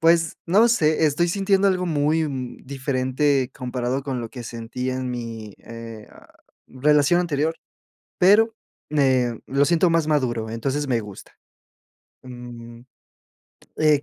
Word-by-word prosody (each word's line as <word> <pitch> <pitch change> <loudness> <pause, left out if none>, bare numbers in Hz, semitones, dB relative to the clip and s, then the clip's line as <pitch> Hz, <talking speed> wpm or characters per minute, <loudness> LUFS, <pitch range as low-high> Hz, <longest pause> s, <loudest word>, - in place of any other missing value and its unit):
pues, 165 -1 +3
no 210 +7 +5
sé, 160 -7 +3
estoy 170 +4 +1
sintiendo 195 +1 +2
algo 180 -1 0
muy 155 0 +1 0.4
diferente 135 0 0
comparado 125 +1 -3
con 135 -3 -3
lo 115 - -6
que 125 -3 -8
sentí 120 +3 -5
en 130 0 -3
mi, 115 -4 -6
eh, 115 -2 -10
ah, - - -18 0.4
relación 150 +5 +3
anterior, 160 -1 -1 0.6
pero, 215 +4 +5 0.4
eh, 130 -5 +2
lo 140 +1 +2
siento 170 +4 +3
más 165 -2 +2
maduro, 120 -7 0
entonces, 135 +6 -2
me 120 -2 +1
gusta. 105 -3 -11 0.9
Mm, 120 -2 -10 1.0
eh, 150 -2 +4
140 Hz, 130 wpm, -23 LUFS, 120-160 Hz, 1.0 s, no